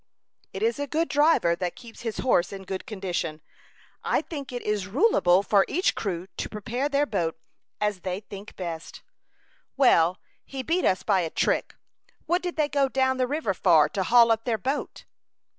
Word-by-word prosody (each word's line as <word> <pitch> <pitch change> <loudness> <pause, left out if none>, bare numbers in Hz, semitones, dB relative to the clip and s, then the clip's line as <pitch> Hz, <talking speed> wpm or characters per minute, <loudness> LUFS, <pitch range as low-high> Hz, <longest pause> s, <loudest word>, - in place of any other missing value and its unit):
"It - - -5
is 455 -9 +1
a 285 - -2
good 320 +5 0
driver 290 - +3
that 180 0 -3
keeps 235 -2 -13
his 225 -2 -4
horse 180 -9 +2
in 195 -1 -7
good 190 0 -6
condition. 180 -6 -3 0.6
I - - +1
think 280 -6 -7
it 245 -1 -5
is 210 -2 -1
rulable 200 - +3
for 200 -1 +4
each 360 +5 +1
crew 180 -4 -3
to - - -3
prepare 240 +6 -3
their 285 0 +2
boat 175 - -2 0.4
as 210 -2 -1
they 185 +2 -4
think 200 0 -11
best." 170 -3 -7 0.7
"Well, 180 -10 +4 0.3
he 270 -1 -6
beat 340 +6 0
us 185 - +2
by 195 -3 +2
a 165 - -2
trick. - - 0 0.5
What 350 +3 +1
did 355 -1 -4
they 305 -2 +1
go 280 -1 +1
down 260 0 +1
the 255 -1 +1
river 285 -7 -1
for 160 -4 +4
to 195 - -2
haul 230 +4 +5
up 225 0 0
their 235 -3 0
boat?" 270 +8 -4
220 Hz, 185 wpm, -26 LUFS, 185-280 Hz, 0.7 s, haul